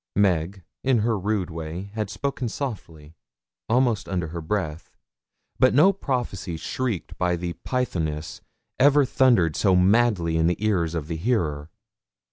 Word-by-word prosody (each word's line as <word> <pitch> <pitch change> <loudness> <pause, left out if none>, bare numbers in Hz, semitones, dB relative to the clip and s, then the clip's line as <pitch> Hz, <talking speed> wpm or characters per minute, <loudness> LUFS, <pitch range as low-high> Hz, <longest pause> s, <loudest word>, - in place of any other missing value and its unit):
Meg, 95 -1 +1 0.2
in 130 -4 +3
her 115 +1 +1
rude 100 -2 -1
way, 85 +4 -6
had 105 -2 -3
spoken 125 +3 -3
softly 85 - -6 0.6
almost 120 -2 +1
under 90 -4 -2
her 85 +1 -5
breath; 80 -3 -4 0.6
but 130 0 +4
no 185 +8 +6
prophecy 120 - -3
shrieked 115 +3 -3
by 90 -1 +1
the 85 0 -4
Pythoness 80 -12 -2 0.4
ever 145 +1 +5
thundered 120 -12 +3
so 95 -3 +3
madly 95 -3 +3
in 80 0 +3
the 90 - +1
ears 90 -6 0
of 80 -3 -3
the 80 +1 -4
hearer. 80 -8 -1
95 Hz, 140 wpm, -24 LUFS, 85-120 Hz, 0.6 s, no